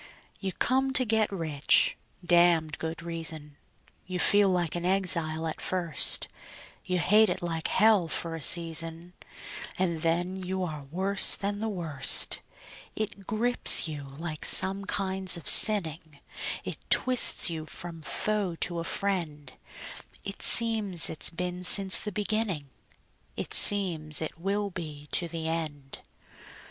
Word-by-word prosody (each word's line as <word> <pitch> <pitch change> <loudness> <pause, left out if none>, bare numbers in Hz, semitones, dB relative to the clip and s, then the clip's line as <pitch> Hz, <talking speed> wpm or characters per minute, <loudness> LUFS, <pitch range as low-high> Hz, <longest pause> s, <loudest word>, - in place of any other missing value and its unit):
You 195 -1 -4
come 265 +5 0
to 255 - +3
get 220 -2 0
rich 155 -6 0 0.3
(damned 170 -3 +2
good 160 +1 -6
reason); 160 -3 -4 0.5
You 185 -1 -5
feel 205 +2 +3
like 175 -3 -2
an 175 - -4
exile 170 -4 0
at 160 - -6
first; 175 -5 +1 0.6
You 185 - -3
hate 210 +5 +3
it - - -4
like 165 -2 -3
hell 210 -4 +2
for 165 +1 -2
a 165 - -7
season, 165 +1 0 0.6
And 170 -4 -2
then 175 +3 -2
you 190 0 -5
are 155 -5 -7
worse 190 +7 +2
than 205 +1 -5
the 220 +1 -3
worst. 165 -8 +2 0.5
It 210 -3 -6
grips 235 -4 +2
you 150 -3 -7
like 155 -2 -7
some 195 +1 +3
kinds 190 -2 -1
of 170 - -11
sinning; 160 -8 +5 0.4
It - - -7
twists 255 -8 +5
you 155 -1 -7
from 170 -1 -8
foe 205 +2 -2
to 170 +1 -3
a - - -4
friend; 165 -8 -4 0.7
It 195 - -7
seems 215 -7 +2
it's 155 - +1
been 180 +1 -5
since 190 +1 +3
the 210 - -6
beginning; 205 -8 -3 0.7
It - - -5
seems 165 -7 +4
it 160 +1 -6
will 200 +3 -3
be 150 -4 -9
to 170 - -1
the 165 -1 -5
end. 155 -4 -6
175 Hz, 140 wpm, -26 LUFS, 160-195 Hz, 0.7 s, sinning